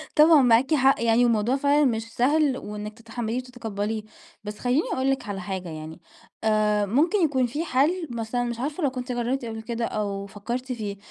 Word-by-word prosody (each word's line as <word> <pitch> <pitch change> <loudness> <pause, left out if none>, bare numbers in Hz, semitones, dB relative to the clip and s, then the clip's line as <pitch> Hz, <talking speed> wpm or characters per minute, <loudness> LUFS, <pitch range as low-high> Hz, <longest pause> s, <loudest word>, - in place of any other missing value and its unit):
طبعًا 305 0 +7
معاكِ 250 +4 +4
حق 270 -4 +3
يعني، 230 +1 +4
والموضوع 230 +1 +2
فعلًا 285 +2 +3
مش 225 -4 0
سهل 280 +1 +2
وإنِك 210 -1 -6
تتحمليه 230 +1 -4
وتتقبليه، 225 -4 -4 0.4
بس 210 0 -7
خليني 255 +6 +1
أقول 265 +1 0
لِك 260 -5 -3
على 195 -2 -4
حاجة 185 -1 -5
يعني 155 +1 -8 0.4
آآ، 210 -1 +2
ممكن 295 - +2
يكون 265 -5 +2
في 290 +7 -3
حل 320 +5 +1
مثلًا 235 +1 -2
مش 235 -1 -4
عارفة 295 +6 -3
لو 280 - +3
كنتِ 255 0 -5
جربتِ 245 +2 -1
قبل 225 -1 -5
كده 230 +1 -3
أو 200 -2 -3
فكرتِ 235 +6 -5
فيه، 210 -4 -4
240 Hz, 185 wpm, -25 LUFS, 215-270 Hz, 0.4 s, طبعًا